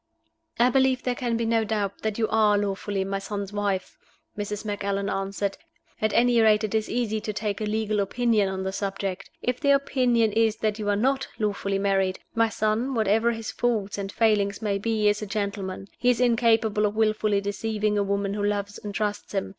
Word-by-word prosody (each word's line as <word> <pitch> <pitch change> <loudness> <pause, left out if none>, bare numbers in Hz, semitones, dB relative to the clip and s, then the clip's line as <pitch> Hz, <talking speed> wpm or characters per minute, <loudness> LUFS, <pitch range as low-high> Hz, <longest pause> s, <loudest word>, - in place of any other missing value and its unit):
"I 245 +2 +4
believe 260 0 +2
there 250 - 0
can 240 -2 -1
be 230 - -1
no 225 0 +2
doubt 205 -2 -2
that 220 -1 -2
you 225 -1 +1
are 210 -1 +4
lawfully 200 -1 -1
my 195 +1 -2
son's 200 0 -5
wife," 200 -2 -2 0.4
Mrs. 210 +1 -4
Macallan 200 -1 -2
answered. 195 +1 -2 0.4
"At 215 0 +2
any 240 -1 +4
rate 215 -1 +4
it 215 - -2
is 220 -1 0
easy 220 -2 -1
to 215 - -3
take 210 0 -3
a - - 0
legal 215 0 0
opinion 215 0 +1
on 190 0 -3
the 190 - -2
subject. 195 -1 -4
If 250 0 -1
the 280 - +1
opinion 250 -5 +3
is 220 -1 +3
that 215 -1 -1
you 205 -1 -2
are 205 - +3
not 265 +5 +1
lawfully 200 -2 -1
married, 195 -1 +1 0.2
my 230 0 +3
son 220 +5 0
(whatever 220 +1 +2
his 225 -1 -5
faults 210 -5 -1
and 195 0 -4
failings 205 -3 +2
may 205 -3 -1
be) 215 0 +1
is 210 +1 +2
a 210 - -4
gentleman. 200 -2 -3
He 245 - +3
is 245 - +2
incapable 225 -3 +3
of 205 - -5
willfully 215 -2 +2
deceiving 210 +1 -1
a - - +2
woman 200 0 -1
who 205 0 -2
loves 205 0 -2
and 205 -1 -7
trusts 210 -1 -2
him. 195 - -1
210 Hz, 200 wpm, -25 LUFS, 200-225 Hz, 0.4 s, I